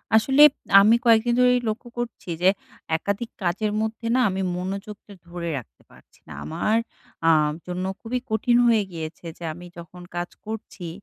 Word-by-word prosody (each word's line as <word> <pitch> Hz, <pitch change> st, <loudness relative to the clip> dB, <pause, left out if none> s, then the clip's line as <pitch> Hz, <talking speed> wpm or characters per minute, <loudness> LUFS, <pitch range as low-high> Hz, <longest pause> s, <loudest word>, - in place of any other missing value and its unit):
আসলে 270 Hz, +6 st, +4 dB, 0.4 s
আমি 220 Hz, +3 st, +6 dB
কয়েকদিন 230 Hz, +1 st, +4 dB
ধরেই 250 Hz, 0 st, +5 dB
লক্ষ্য 230 Hz, +3 st, -5 dB
করছি 240 Hz, -6 st, -5 dB
যে, 180 Hz, -, +4 dB, 0.5 s
একাধিক 200 Hz, +6 st, -3 dB
কাজের 205 Hz, +5 st, 0 dB
মধ্যে 220 Hz, +1 st, -3 dB
না -, -, +3 dB
আমি 190 Hz, +1 st, -2 dB, 0.2 s
মনোযোগটা 200 Hz, +3 st, -6 dB
ধরে 170 Hz, -1 st, -5 dB
রাখতে 125 Hz, -, -11 dB
পারছি -, -, -21 dB
না। 80 Hz, -, -9 dB
আমার 215 Hz, -, 0 dB, 0.5 s
আ -, -, +7 dB, 0.4 s
জন্য 180 Hz, +1 st, -3 dB, 0.2 s
খুবই 245 Hz, +2 st, -2 dB
কঠিন 240 Hz, +2 st, +2 dB
হয়ে 225 Hz, -3 st, +4 dB
গিয়েছে, 160 Hz, 0 st, -7 dB
যে 170 Hz, -, -11 dB
আমি 175 Hz, +2 st, -11 dB
যখন 170 Hz, +1 st, -11 dB
কাজ 175 Hz, +1 st, -3 dB, 0.2 s
করছি 215 Hz, -5 st, -7 dB
205 Hz, 160 wpm, -24 LUFS, 175-230 Hz, 0.5 s, আ